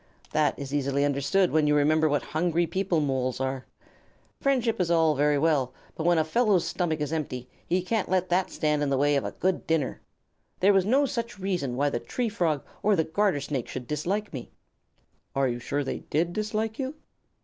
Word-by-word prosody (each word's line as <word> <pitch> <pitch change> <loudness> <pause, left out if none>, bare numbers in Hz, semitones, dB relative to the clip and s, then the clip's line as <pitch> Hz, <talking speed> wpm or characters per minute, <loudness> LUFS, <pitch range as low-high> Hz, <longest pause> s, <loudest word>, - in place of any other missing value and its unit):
That 150 -2 +2
is 140 0 -6
easily 140 0 +1
understood 145 +7 +2
when 155 -1 +3
you 150 - +3
remember 155 +2 +3
what 145 -1 +1
hungry 170 +1 0
people 175 -1 0
Moles 130 -3 -1
are. 130 0 -3 0.7
Friendship 240 -6 +1
is 175 - 0
all 165 -2 +4
very 145 +1 +2
well, 140 -4 +1 0.2
but 160 - -2
when 175 -1 +4
a 160 - +4
fellow's 200 +2 +2
stomach 160 -4 -1
is 150 +1 -2
empty, 130 -6 -3 0.2
he 180 +1 +1
can't 215 +2 -1
let 185 -1 +1
that 180 +1 +2
stand 150 -2 0
in 145 - +1
the 135 - +1
way 145 +1 +3
of 140 - +1
a - - -4
good 185 0 -1
dinner. 160 -5 0 0.6
There 200 +2 +5
was 195 0 +3
no 270 +5 +4
such 235 -4 -4
reason 180 -10 -2
why 145 +2 +1
the - - -1
Tree 245 -2 -2
Frog 165 -9 0 0.2
or 210 0 +3
the 160 - +2
Garter 175 -2 +1
Snake 140 -3 -3
should 130 -1 -6
dislike 180 - -2
me." 130 -4 -6 0.9
"Are 135 -1 +2
you 120 -1 -2
sure 145 +4 -2
they 135 - -3
did 170 +3 -1
dislike 215 +2 -2
you?" 270 +2 -3
160 Hz, 205 wpm, -27 LUFS, 145-190 Hz, 0.9 s, There